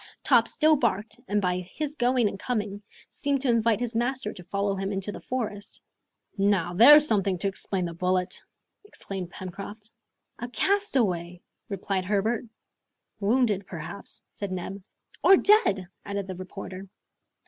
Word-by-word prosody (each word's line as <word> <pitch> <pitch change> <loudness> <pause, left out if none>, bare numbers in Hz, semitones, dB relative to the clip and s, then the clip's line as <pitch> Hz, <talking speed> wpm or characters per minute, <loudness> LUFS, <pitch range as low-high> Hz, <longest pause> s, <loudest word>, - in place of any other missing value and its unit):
Top - - +4
still 310 0 +4
barked, 220 -2 -1
and 210 +1 +1
by 180 0 +1
his 285 - -5
going 245 -3 +2
and 195 - -5
coming, 205 -4 -3 0.3
seemed 285 -4 -1
to 270 - +1
invite 230 -2 +3
his 240 -1 -3
master 240 -1 -1
to 180 - -11
follow 200 +2 -1
him 195 +1 -3
into 195 +1 -3
the - - -9
forest. 210 -5 -4 0.6
"Now 195 -3 +2
there's 295 +10 +8
something 195 -5 +1
to 200 - -1
explain 190 -1 -3
the 170 - -5
bullet!" 180 +1 -1 0.4
exclaimed 195 - -7
Pencroft. 200 +5 -8 0.5
"A 245 - -5
castaway!" 220 - 0 0.3
replied 195 -1 -2
Herbert. 215 +5 0 0.7
"Wounded, 210 -2 +1
perhaps!" 170 +3 -8
said 200 -2 -5
Neb. 190 +2 -5 0.4
"Or 385 - +8
dead!" 205 - +4 0.2
added 200 -1 -3
the 190 - -6
reporter. 185 +1 -8
200 Hz, 145 wpm, -27 LUFS, 190-240 Hz, 0.7 s, there's